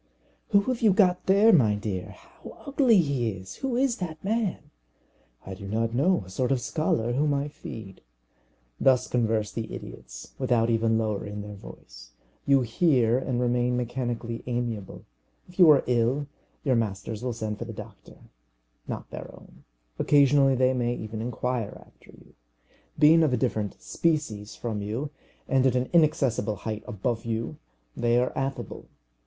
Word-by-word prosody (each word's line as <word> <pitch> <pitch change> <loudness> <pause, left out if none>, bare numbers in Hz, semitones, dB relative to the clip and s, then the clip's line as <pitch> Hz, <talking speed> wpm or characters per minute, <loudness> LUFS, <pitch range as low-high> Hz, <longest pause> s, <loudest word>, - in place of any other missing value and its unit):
"Who 200 -2 +5
have 255 +2 -2
you 215 -4 +5
got 180 -2 +3
there, 200 +4 +6
my 110 - +4
dear? 100 -4 -5
How - - -14
ugly 270 -5 +4
he 140 -9 +1
is! 95 -2 -8
Who 265 -3 -2
is 255 -2 +1
that 160 -4 -6
man?" 215 0 -2 0.7
"I 95 - -6
do 100 +1 -9
not 115 +2 -1
know. 145 - +2
A - - -13
sort 125 +6 -1
of 135 - +2
scholar, 120 -4 -1
whom 145 +2 +1
I 140 +1 -2
feed." 110 -8 -10 0.8
Thus 130 -1 +3
converse 110 -3 0
these 115 -1 -5
idiots, - - -9
without 120 -3 +2
even 115 0 +2
lowering 105 -2 -2
their 105 0 -8
voice. - - -13 0.3
You 140 -1 +5
hear, 125 -1 +2
and 130 -2 -2
remain 125 0 +1
mechanically 120 -1 -3
amiable. 120 -5 -4 0.4
If 180 +1 -17
you 175 -3 +9
are 150 - +6
ill, 125 +4 +1 0.4
your 130 -4 +2
masters 110 -1 -2
will 125 - -1
send 110 -2 -4
for 120 - -4
the 115 - -7
doctor 110 - -11 0.7
not - - -5
their - - -7
own. - - -17 0.3
Occasionally 140 -1 +4
they 130 +1 +3
may 120 -1 0
even 110 -1 -6
inquire 125 -1 -3
after - - -24
you. - - -18 0.6
Being 160 +2 +6
of 155 -5 +2
a - - +2
different 105 -2 -2
species 150 -11 -1
from 110 -3 -4
you, 115 +8 -4 0.4
and 135 0 +3
at 130 - +1
an 125 0 -1
inaccessible 145 -9 +2
height 110 +1 -5
above 115 +3 -2
you, 115 0 -3 0.4
they 120 0 +2
are 125 +1 0
affable. 135 0 -4
120 Hz, 160 wpm, -26 LUFS, 110-145 Hz, 0.8 s, you